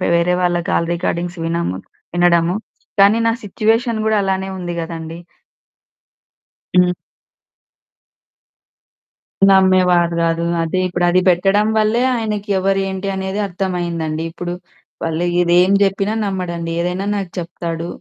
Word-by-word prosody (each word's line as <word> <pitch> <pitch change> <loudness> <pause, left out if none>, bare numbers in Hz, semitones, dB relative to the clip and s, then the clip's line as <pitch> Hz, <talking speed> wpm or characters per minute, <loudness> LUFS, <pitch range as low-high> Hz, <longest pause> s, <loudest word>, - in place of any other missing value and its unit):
వేరే 175 +1 +2
వాళ్ళ 175 -1 +2
call 170 - +1
recordings 170 0 -3
విన‌ము 165 - -2 0.4
వినడము. 175 0 +3 0.5
కానీ, 205 +3 +5
నా 230 - +3
సిట్యుయేషన్ 225 +3 0
గూడా 220 -1 +2
అలానే 190 0 -1
ఉంది 175 -1 -4
గదండీ! 165 0 -6 1.6
హ్మ్. 180 0 +5 2.6
నమ్మేవారు 185 -3 +4
గాదు. 165 0 0 0.2
అదే 165 +3 -1
ఇప్పుడది 175 0 +2
పెట్టడం 195 +4 +3
వల్లే, 215 +2 +2
ఆయనకి 210 -2 -3
ఎవరేంటి 195 0 -1
అనేది 190 +1 -3
అర్థమయిందండి. 175 -4 -3
ఇప్పుడు, 175 +1 -5 0.5
వాళ్ళు 165 +1 -1 0.2
ఇది 175 0 +2
ఏం 185 - +1
చెప్పినా 195 +2 0
నమ్మడండి, 175 -4 -3
ఏదైనా 180 +3 -2
నాకు 195 -3 -4
చెప్తాడు. 170 -1 -5
180 Hz, 110 wpm, -18 LUFS, 170-195 Hz, 2.6 s, కానీ